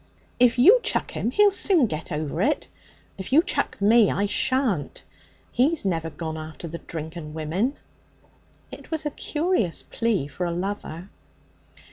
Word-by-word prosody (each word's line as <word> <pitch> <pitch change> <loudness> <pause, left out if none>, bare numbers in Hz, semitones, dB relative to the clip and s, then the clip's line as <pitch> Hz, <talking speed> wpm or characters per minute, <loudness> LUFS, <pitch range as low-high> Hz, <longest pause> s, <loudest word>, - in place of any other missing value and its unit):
'If 245 0 +4
you 395 - +7
chuck - - 0
him, 230 - -2
he'll 410 +10 +4
soon 380 -7 +3
get 155 -7 -5
over 155 +2 -2
it; 290 +5 +1 0.5
if 190 - -6
you 310 +5 +6
chuck 395 - -2
me, 215 +1 +5
I 200 - 0
shan't. 235 - 0 0.5
He's 285 +1 +1
never 165 -4 -1
gone 160 +1 -5
after 155 +2 -8
the 170 +1 -7
drink 160 0 -7
and 155 -2 -8
women.' 180 - -1 0.9
It - - -11
was 315 -1 -3
a 295 - -1
curious 300 - -1
plea 230 -10 -1
for 175 +5 -4
a - - -2
lover. 180 -1 -5
200 Hz, 155 wpm, -24 LUFS, 160-265 Hz, 0.9 s, you